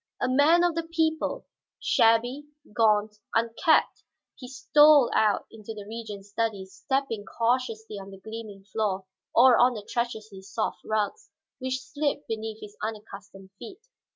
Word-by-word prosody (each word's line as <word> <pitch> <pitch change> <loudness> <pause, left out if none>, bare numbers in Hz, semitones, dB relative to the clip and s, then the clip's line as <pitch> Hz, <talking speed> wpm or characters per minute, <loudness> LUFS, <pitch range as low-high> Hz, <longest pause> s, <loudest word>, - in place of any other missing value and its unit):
A - - 0
man 290 +7 +4
of 350 -1 +2
the 335 - -1
people, 320 +8 -1 0.3
shabby, 240 +6 +2 0.3
gaunt, 210 -1 +2 0.2
unkempt, 230 +8 +2 0.3
he 250 - -10
stole 285 +1 +5
out 210 -2 +2
into 220 0 -9
the 205 -1 -8
Regent's 210 -3 -8
study, 210 -3 -2
stepping 250 +2 -3
cautiously 230 -2 -2
on 195 0 -10
the 195 - -11
gleaming 215 -1 -9
floor 200 -1 -2 0.3
or 250 0 +7
on 245 0 +4
the 210 -2 -7
treacherously 220 -5 -4
soft 205 +3 -3
rugs 215 - -2 0.3
which 260 0 -3
slipped 285 +2 -2
beneath 220 0 -5
his 210 -1 -10
unaccustomed 200 -3 -8
feet. 425 +3 -11
225 Hz, 140 wpm, -26 LUFS, 210-260 Hz, 0.3 s, or